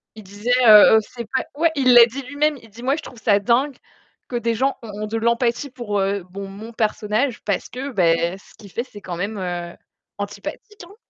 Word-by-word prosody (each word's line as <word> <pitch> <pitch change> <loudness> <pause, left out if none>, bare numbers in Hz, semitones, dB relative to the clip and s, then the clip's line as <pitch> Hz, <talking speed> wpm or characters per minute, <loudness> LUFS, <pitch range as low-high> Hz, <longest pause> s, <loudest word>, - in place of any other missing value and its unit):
Il 215 - -11
disait, 205 +5 -7 0.2
heu, 215 +1 +9
heu, - - +5
c'est 235 +2 -9
pas - - +2 0.2
ouais, 335 0 +4
il 255 -3 +4
l'a 240 -1 +10
dit 260 +4 -7
lui-même. 290 +2 0
Il 225 - -16
dit: 235 +4 -12
«Moi, 270 +3 +2
je - - -7
trouve 235 -4 -12
ça 205 -2 +3
dingue 250 +6 +1 0.5
que 245 - -6
des 235 -1 -1
gens 270 +4 0
ont 210 -2 -7
ont - - -3
de 225 +1 -3
l'empathie 235 +4 0
pour, 235 -5 -3
heu, 195 -1 -1
mon 195 0 -6
mon 215 +4 -10
personnage, 220 +3 -1
parce 200 - -2
que 265 +3 -5
beh, 170 -2 +1
ce - - -20
qu'il 200 -3 -14
fait, 235 - -3
c'est 205 -5 -13
quand 175 -2 -6
même, 205 +3 -3
heu, 175 -2 -4 0.4
antipathique, 420 -2 -7
hein.» 395 +4 -16
225 Hz, 225 wpm, -21 LUFS, 200-250 Hz, 0.5 s, l'a